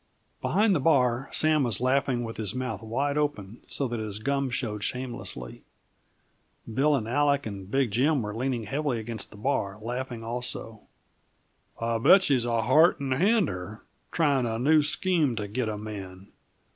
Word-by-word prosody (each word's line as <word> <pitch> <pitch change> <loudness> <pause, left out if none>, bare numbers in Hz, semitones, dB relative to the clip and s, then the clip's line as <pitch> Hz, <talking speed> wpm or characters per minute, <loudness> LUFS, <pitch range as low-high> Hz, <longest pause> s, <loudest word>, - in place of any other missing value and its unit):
Behind 210 +1 +3
the 165 - +2
bar, 130 -3 +2
Sam 155 -1 +3
was 120 -7 0
laughing 130 -1 +1
with 115 -1 -6
his 110 0 -3
mouth 130 -2 -3
wide 135 +6 -1
open 115 -8 -3
so 140 - -1
that 120 -1 -4
his 105 -2 -4
gum 140 +4 -1
showed 105 -4 -3
shamelessly. 120 - -4 1.1
Bill 145 +5 +3
and 115 -5 -2
Aleck 140 +2 +2
and 100 -3 -7
Big 135 -1 +1
Jim 135 +4 +2
were 105 0 -4
leaning 125 -1 -1
heavily 135 +2 -1
upon 110 0 -6
the 105 - -14
bar, 105 -4 -1
laughing 120 +1 -5
also. 115 -2 -5 1.0
"I'll 115 0 -1
bet 185 - +6
she's 135 -8 +2
a 115 -2 0
Heart 155 +9 +5
and 135 -2 -1
Hander, 130 - 0 0.3
tryin' 140 -7 +2
a 115 0 -2
new 150 +6 +4
scheme 155 -2 +1
to 105 -2 -3
git 115 +2 -2
a 105 - -3
man. 100 -2 -8
125 Hz, 165 wpm, -27 LUFS, 110-140 Hz, 1.1 s, bet